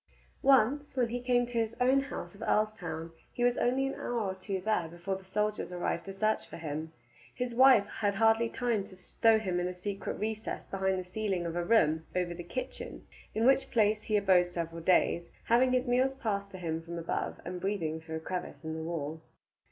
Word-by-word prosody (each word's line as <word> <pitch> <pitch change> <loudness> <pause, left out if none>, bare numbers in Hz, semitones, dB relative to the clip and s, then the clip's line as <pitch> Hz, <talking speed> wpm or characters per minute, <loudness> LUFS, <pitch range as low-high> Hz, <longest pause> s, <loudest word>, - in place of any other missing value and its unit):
Once 275 +2 +3
when 245 -2 +2
he 245 +2 -2
came 245 0 +2
to 240 -1 -2
his 225 0 -1
own 260 +2 +4
house 270 -10 -5
of 200 - -15
Earlstoun 210 -7 -1 0.2
he 245 - -2
was 245 0 +4
only 260 +2 +2
an 270 - -2
hour 240 -1 -2
or 195 -4 -1
two 190 +1 -4
there 185 -3 0
before 175 +4 -4
the 190 - -9
soldiers 210 +1 -1
arrived 175 -1 -2
to 195 - -6
search 215 +2 0
for - - -8
him. 160 0 -4 0.4
His 250 -1 -2
wife 255 -4 +7
had 205 -1 -1
hardly 225 +2 +4
time 235 -5 0
to 200 -2 -14
stow 220 +4 +3
him 185 -5 -1
in 175 - 0
a 180 - -5
secret 195 +2 -4
recess 215 +1 -3
behind 190 -1 -1
the 185 -1 -5
ceiling 195 -4 -1
of 165 0 -3
a 175 - 0
room 160 -6 +3
over 180 -1 0
the 175 - -7
kitchen, 175 +9 -6 0.3
in 220 +1 +2
which 270 +1 +4
place 215 -2 +3
he 215 -1 +1
abode 185 -3 +4
several 165 -1 -4
days, 170 0 +2
having 250 +2 +4
his 255 0 +2
meals 255 +2 +2
passed 200 -6 -2
to 190 - -9
him 165 -2 -3
from 170 +1 -7
above, 165 - -3
and 180 0 -5
breathing 165 -5 -2
through 160 0 -6
a - - -2
crevice 160 -3 -5
in 160 0 -4
the 160 - -4
wall. 160 -1 -4
200 Hz, 215 wpm, -31 LUFS, 175-230 Hz, 0.4 s, wife